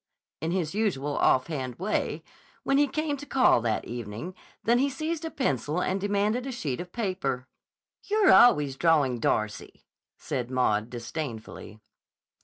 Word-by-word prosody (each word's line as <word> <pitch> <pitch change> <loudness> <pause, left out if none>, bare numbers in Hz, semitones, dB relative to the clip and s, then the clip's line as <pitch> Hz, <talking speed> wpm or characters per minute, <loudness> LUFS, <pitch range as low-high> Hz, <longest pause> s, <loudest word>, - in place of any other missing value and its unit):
in 160 - -1
his 170 -3 -1
usual 160 -10 -1
offhand 130 -2 +1
way, 190 - -2 0.4
when 275 +1 +2
he 290 - +4
came 305 +1 -2
to 285 - -9
call 255 - +4
that 110 -2 -1
evening, 120 - -6 0.3
than 235 +2 +3
he 280 +2 +2
seized 315 +4 -3
a 325 - -3
pencil 150 - -1
and 185 +1 -1
demanded 205 +5 0
a - - -3
sheet 150 - -3
of 175 0 -9
paper. 185 - -2 0.6
"You're 420 -1 +4
always 145 - +5
drawing 145 -7 +3
Darcy!" 110 -1 -2 0.3
said 130 -5 -4
Maud 115 -4 +1
disdainfully. 120 -3 -7
165 Hz, 145 wpm, -27 LUFS, -, 0.6 s, always